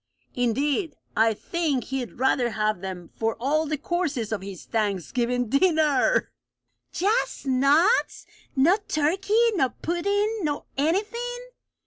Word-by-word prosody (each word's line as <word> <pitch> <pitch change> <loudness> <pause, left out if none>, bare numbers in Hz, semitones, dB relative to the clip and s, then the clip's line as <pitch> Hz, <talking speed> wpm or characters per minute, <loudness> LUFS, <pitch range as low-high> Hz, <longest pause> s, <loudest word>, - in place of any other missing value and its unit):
"Indeed, 275 - 0 0.2
I 225 0 +3
think 295 0 -1
he'd 265 -3 -4
rather 255 -1 +2
have 215 -4 -1
them 185 -3 -7
for 225 0 0
all 305 +5 +1
the 305 0 -1
courses 300 - -2
of 215 -3 -2
his 195 -2 -8
Thanksgiving 230 +4 -1
dinner!" 310 - +2 0.6
"Just 420 -3 0
nuts! 280 - +3 0.3
No 315 +9 +4
turkey, 395 +10 +2
nor 300 -10 +2
puddin', 405 +6 0
nor 295 -3 -2
anything?" 465 - -1
285 Hz, 115 wpm, -25 LUFS, 235-365 Hz, 0.6 s, No